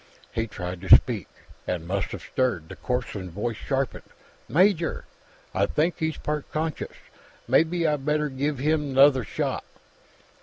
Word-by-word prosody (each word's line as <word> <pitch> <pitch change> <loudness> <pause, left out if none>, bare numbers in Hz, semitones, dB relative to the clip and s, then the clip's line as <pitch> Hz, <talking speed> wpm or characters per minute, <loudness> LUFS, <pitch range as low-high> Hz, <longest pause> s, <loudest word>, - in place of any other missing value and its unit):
He 115 0 -1
tried 90 -3 -6
to 95 - +10
speak, - - +1 0.4
and 85 -2 -2
must 95 0 -1
have - - -7
stirred; 115 -12 -1
the - - -8
corpsman's 120 -7 -3
voice 110 +4 -2
sharpened. 135 +2 -3 0.4
"Major, 175 -1 +2 0.5
I 100 +1 +2
think 165 +4 0
he's 160 -1 -1
part 150 -1 -3
conscious. 155 0 -3 0.5
Mebbe 165 +7 +3
I 150 -1 +2
better 150 +2 0
give 140 +1 -2
him 145 0 0
'nother 135 -2 +6
shot." 90 - -2
135 Hz, 145 wpm, -26 LUFS, 105-150 Hz, 0.5 s, to